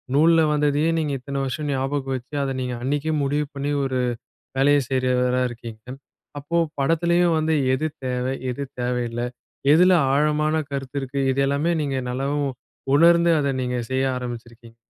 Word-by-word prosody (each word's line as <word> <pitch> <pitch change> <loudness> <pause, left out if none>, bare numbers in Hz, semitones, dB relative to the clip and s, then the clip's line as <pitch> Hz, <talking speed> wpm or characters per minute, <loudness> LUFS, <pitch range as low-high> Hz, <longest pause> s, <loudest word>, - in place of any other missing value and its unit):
நூல்ல 165 +2 +5
வந்ததையே, 150 +1 +2
நீங்க 150 -3 -1
இத்தனை 140 +2 -4
வருஷம் 145 +3 -3
ஞாபகம் 135 0 -1
வச்சு, 130 +3 -9
அதை 135 - -1
நீங்க 125 -1 -3
அன்னைக்கே 145 +4 -1
முடிவு 145 +2 0
பண்ணி 140 +1 -2
ஒரு 130 -1 -1 0.6
வேலையைச் 140 -1 +3
செய்றவரா 125 -1 +1
இருக்கீங்க. 115 -2 -9 0.6
அப்போ 145 +4 -3 0.2
படத்திலயும் 170 +3 +2
வந்து 160 0 +1 0.2
எது 155 +4 -1 0.2
தேவை, 125 +1 -1 0.2
எது 125 +3 -4 0.2
தேவையில்லை, 120 -1 -2 0.5
எதுல 180 +4 +6 0.2
ஆழமான 150 +1 +2 0.2
கருத்து 135 -1 -5
இருக்கு 135 +1 -3
இதெல்லாமே 140 +4 +1
நீங்க 140 -3 -1
நல்லவும் 140 +3 -1 0.5
உணர்ந்து 170 +3 +5
அதை 140 -1 +1
நீங்கச் 125 -2 -3
செய்ய 130 0 +1
ஆரம்பிச்சிருக்கீங்க. 120 -2 -8
140 Hz, 140 wpm, -23 LUFS, 125-150 Hz, 0.6 s, எதுல